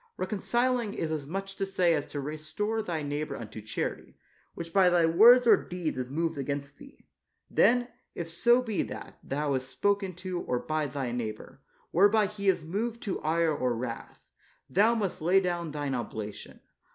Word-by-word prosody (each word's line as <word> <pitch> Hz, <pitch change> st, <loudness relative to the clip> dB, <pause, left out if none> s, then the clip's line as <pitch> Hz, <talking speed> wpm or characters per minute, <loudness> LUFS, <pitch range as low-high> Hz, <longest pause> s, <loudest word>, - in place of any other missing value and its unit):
Reconciling 235 Hz, +3 st, 0 dB
is 160 Hz, -, -2 dB
as 150 Hz, -3 st, -3 dB
much 195 Hz, +4 st, -5 dB
to -, -, -1 dB
say 185 Hz, -3 st, +2 dB
as 145 Hz, -3 st, -1 dB
to 145 Hz, -, -5 dB
restore 155 Hz, +10 st, -3 dB
thy 165 Hz, -7 st, -3 dB
neighbor 145 Hz, +1 st, -3 dB
unto 110 Hz, -1 st, -8 dB
charity, 110 Hz, +1 st, -4 dB, 0.4 s
which 165 Hz, -1 st, -7 dB
by 190 Hz, -2 st, +6 dB
thy 175 Hz, -2 st, +4 dB
words 230 Hz, +10 st, +7 dB
or 235 Hz, -, +8 dB
deeds 175 Hz, -7 st, -4 dB
is 125 Hz, 0 st, -4 dB
moved 165 Hz, +1 st, -1 dB
against 140 Hz, 0 st, -4 dB
thee; 275 Hz, -, -15 dB, 0.5 s
then, 245 Hz, 0 st, +4 dB, 0.3 s
if 170 Hz, -, -4 dB
so 240 Hz, +9 st, +3 dB
be 220 Hz, -5 st, -1 dB
that -, -, -7 dB
thou 145 Hz, +1 st, -1 dB
hast 130 Hz, 0 st, -2 dB
spoken 195 Hz, +7 st, 0 dB
to 185 Hz, 0 st, -4 dB
or 125 Hz, -, -1 dB
by 155 Hz, +3 st, -1 dB
thy 135 Hz, -3 st, -3 dB
neighbor, 110 Hz, -3 st, -5 dB, 0.3 s
whereby 205 Hz, +4 st, +5 dB
he 200 Hz, 0 st, -5 dB
is 180 Hz, -4 st, +3 dB
moved 220 Hz, +8 st, -3 dB
to 195 Hz, -, -3 dB
ire 160 Hz, +1 st, +2 dB
or 125 Hz, -3 st, 0 dB
wrath, 115 Hz, 0 st, -6 dB, 0.5 s
thou 220 Hz, +5 st, +3 dB
must 200 Hz, -8 st, -2 dB
lay 180 Hz, +4 st, +4 dB
down 175 Hz, -3 st, -2 dB
thine 145 Hz, -2 st, -3 dB
oblation. 110 Hz, -3 st, -6 dB
170 Hz, 175 wpm, -29 LUFS, 145-200 Hz, 0.5 s, or